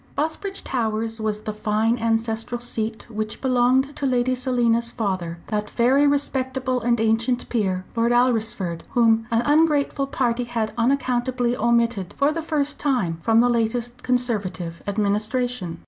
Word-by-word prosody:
Busbridge 325 +6 -3
Towers 225 -2 -2
was 215 -1 -2
the 215 -1 -4
fine 215 +2 0
ancestral 225 +1 -1
seat 225 -2 -4
which 215 -2 -4
belonged 260 +2 +2
to 280 - -1
Lady 250 0 +1
Selina's 240 -2 +1
father, 185 -8 -3
that 210 -1 -2
very 265 +5 +3
respectable 260 -3 0
and 235 0 +1
ancient 225 +3 +1
peer, 190 -5 -1
Lord 230 +1 +2
Alresford, 225 -8 +1
whom 225 -2 +3
an 230 +1 +1
ungrateful 290 -2 +2
party 245 -2 0
had 230 -3 -2
unaccountably 245 0 0
omitted 235 -5 +1
for 285 +1 +3
the 330 +1 -3
first 295 -2 -1
time 205 - 0
from 225 +3 +4
the 245 - +4
latest 240 +1 -1
Conservative 205 -10 -2
administration. 210 -1 -1
235 Hz, 140 wpm, -23 LUFS, 220-255 Hz, -, from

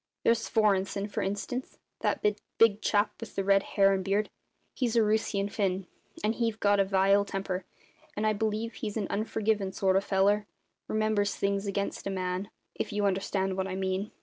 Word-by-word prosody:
There's 230 0 +4
Svorenssen, 200 -2 +2
for - - -2
instance 205 +6 -3 0.2
that - - -1 0.3
big 220 -2 +5
chap 210 0 +2
with 230 - -9
the 195 - 0
red 195 0 +4
hair 195 -1 +3
and 190 -1 -1
beard 200 +2 0 0.4
he's 240 -3 -1
a 230 - +5
Roosian 210 -2 +1
Finn; 195 -2 -1 0.4
and 215 +1 +2
he've 230 -2 -1
got 205 0 +3
a - - +6
vile 195 +1 +3
temper, 195 -2 -3 0.5
and 215 - 0
I 215 - +3
believe 220 +2 -1
he's 215 -1 -4
an 210 - -1
unforgivin' 210 -2 0
sort 190 -1 +2
of 195 - +3
feller, 205 +2 +2 0.4
remembers 215 -1 +1
things 200 0 -1
against 200 0 -2
a - - -1
man 185 +1 -2 0.2
if 215 - -4
you 205 0 0
understand 190 0 0
what 190 0 -1
I 185 - -4
mean. 190 +2 -1
200 Hz, 180 wpm, -29 LUFS, 195-215 Hz, 0.5 s, a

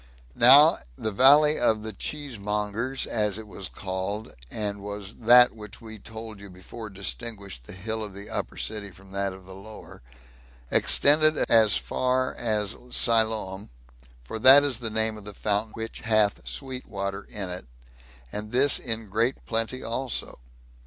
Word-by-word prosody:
Now 140 - +7 0.2
the 110 - -4
Valley 145 +7 +5
of 110 -3 +1
the 110 0 -6
Cheesemongers, 115 -1 -3
as 105 -3 0
it 110 - -8
was 100 -2 -7
called, 100 +3 -5 0.2
and 105 - -4
was 100 0 -7
that 120 +1 +5
which 105 0 -11
we 110 -1 -11
told 110 0 -10
you 100 0 -12
before 100 +5 -10
distinguished 95 - -6
the - - -9
hill 110 +4 -4
of 105 -2 -6
the 100 +1 -9
upper - - -5
city 105 -2 -4
from 95 0 -18
that 100 0 -2
of 95 0 -13
the 95 - -12
lower, 105 - -12 0.7
extended 155 +1 +4
as 110 -2 +5
far 130 0 -1
as 105 -2 -1
Siloam; 110 -5 +1 0.5
for 85 - -7
that 135 +4 +9
is 135 -5 0
the 115 -2 -3
name 110 0 -1
of 105 - -14
a 105 - -8
fountain 105 +1 -2
which 115 0 -5
hath 110 -3 +1
sweet 130 -2 -6
water 100 -1 -5
in 100 -4 -4
it, 90 - -7 0.6
and 105 +1 -6
this 135 +3 +4
in 115 -3 -4
great 115 +6 -1
plenty 115 +3 -2
also. 120 - -3
110 Hz, 160 wpm, -25 LUFS, 100-120 Hz, 0.7 s, that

